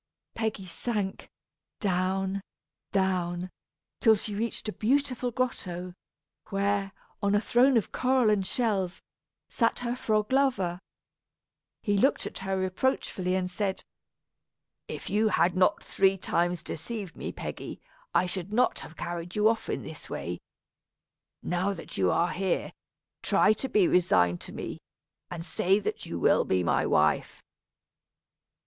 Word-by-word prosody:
Peggy 220 -4 -2
sank 200 +1 -3 0.5
down, 190 0 0 0.5
down 180 -2 0 0.5
until 225 -2 +6
she 210 0 -4
reached 225 +2 -2
a 215 - -2
beautiful 255 +1 +1
grotto, 185 -8 -3 0.6
where, 200 0 0 0.3
on 200 0 +2
a - - +5
throne 245 +3 +4
of 220 - 0
coral 255 -3 +3
and 205 -2 +2
shells, 195 -3 -1 0.4
sat 230 -2 +1
her 240 +1 0
frog 215 -2 0
lover. 210 -11 +2 1.0
He 205 -2 +2
looked 270 - +3
at - - -5
her 190 0 -2
reproachfully, 185 -1 0
and 185 -1 0
said: 190 +1 -2 1.0
"If - - -6
you 215 +2 +3
had 180 -4 +3
not 185 0 +3
three 195 0 +2
times 175 -1 0
deceived 200 +2 -6
me, - - -5
Peggy, - - -6 0.3
I - - +3
should 185 +1 -3
not 245 +4 +2
have 165 - -11
carried 175 0 -5
you 210 0 +4
off 225 0 +1
in - - -2
this - - -9
way. - - -4 1.0
Now 185 +3 0
that - - -9
you 95 -2 +2
are 170 - +2
here, 190 -1 -1 0.5
try 215 - +4
to 265 +5 -4
be 205 -6 +4
resigned 90 - +3
to - - -6
me, - - -6 0.5
and 170 -1 -6
say 190 +2 +2
that 210 - -3
you - - -4
will - - +4
be 90 -1 +1
my - - +2
wife." - - +2
195 Hz, 140 wpm, -28 LUFS, 180-220 Hz, 1.0 s, until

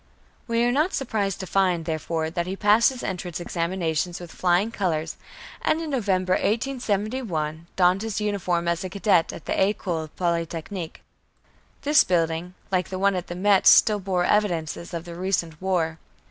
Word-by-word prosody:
We 230 0 +1
are 240 - +3
not 305 +9 +1
surprised 210 -7 -1
to - - -4
find, 180 -3 +1
therefore, 160 0 -2
that 170 +1 -2
he 190 - -3
passed 210 +3 +5
his 260 -2 -7
entrance 180 -3 -4
examinations 170 -1 -2
with 175 -2 -9
flying 185 +5 +1
colors, 165 -7 -2 0.5
and 315 - +1
in 320 -2 -4
November, 190 -7 +1
1871, 210 - -1
donned 185 +1 +3
his 220 -1 -3
uniform 185 -5 -1
as 170 +2 0
a 185 - -4
cadet 190 -3 +2
in - - -9
the - - -1
École 180 -5 0
Polytechnique. 170 0 -3 0.8
This 295 +1 +5
building, 170 0 -1 0.2
like 185 -2 0
the 185 - -4
one 200 +1 +3
at 180 -1 -4
Metz, 200 0 +5
still 210 -2 +6
bore 185 -2 0
evidences 175 -5 0
of 170 +1 -5
the 170 - -8
recent 170 -3 -2
war. 165 -4 0
185 Hz, 160 wpm, -24 LUFS, 170-205 Hz, 0.8 s, still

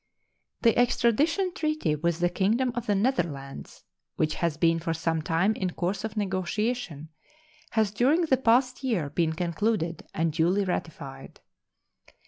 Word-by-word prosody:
The 230 -2 +5
extradition 295 - +2
treaty 310 - 0
with 170 +2 -1
the 175 - +3
Kingdom 225 +8 +1
of 240 0 -4
the 205 - +2
Netherlands, 170 - -2 0.3
Which 155 -1 0
has 170 -3 -1
been 165 0 +3
for 165 0 -2
some 165 0 -1
time 165 +7 +1
in 185 -3 -2
course 190 +3 -2
of 220 -1 -5
negotiation, 190 - -2 0.6
has 220 -3 +2
during 265 - +3
the 275 -5 +3
past 255 +2 +2
year 180 - -1
been 165 -2 +1
concluded 170 0 -1
and 165 -1 -1
duly 180 +5 +2
ratified. 140 -7 -5
190 Hz, 140 wpm, -27 LUFS, 165-235 Hz, 0.6 s, The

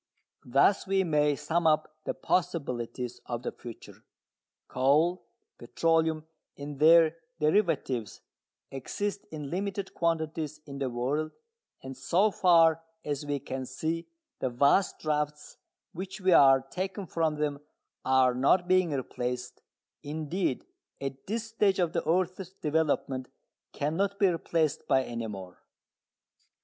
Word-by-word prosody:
Thus 140 +12 +3
we 195 0 +2
may 150 -3 +2
sum 160 +3 0
up 155 0 +1
the - - -2
possibilities 125 -9 -2
of 120 0 -4
the - - -2
future. 120 -2 -11 0.6
Coal, 145 +3 +2 0.3
petroleum 160 +4 +1 0.3
and 140 0 -7
their 165 +1 +6 0.2
derivatives 150 - 0 0.5
exist 200 +9 -4
in 150 -3 -7
limited 195 +1 -3
quantities 160 -2 -1
in 140 -1 -8
the 135 -2 -1
world, 135 +6 -2 0.5
and 135 0 -7
so 195 +10 +2
far 165 -4 +5 0.2
as 145 0 -3
we 145 0 0
can 130 -1 -5
see 160 +5 -3 0.3
the 130 - 0
vast 140 +10 +3
drafts 150 -1 -3 0.4
which 190 +3 -6
we 190 -1 +2
are 135 -4 +7
taking 190 +8 -5
from 160 -3 0
them 150 -1 -2 0.4
are 130 -1 +4
not 140 +8 +3
being 185 -1 +3
replaced, 125 -3 -4 0.4
indeed 155 0 -2 0.3
at 135 -1 -6
this 220 +2 -2
stage 210 -4 +2
of 175 -2 +1
the 170 - 0
earth's 185 +1 0
development 150 -6 -1 0.4
cannot 185 +7 -1
be 200 -2 +4
replaced, 165 -3 -1
by 130 - +3
any 115 -2 -4
more. 95 -4 -9
155 Hz, 125 wpm, -29 LUFS, 135-175 Hz, 0.6 s, are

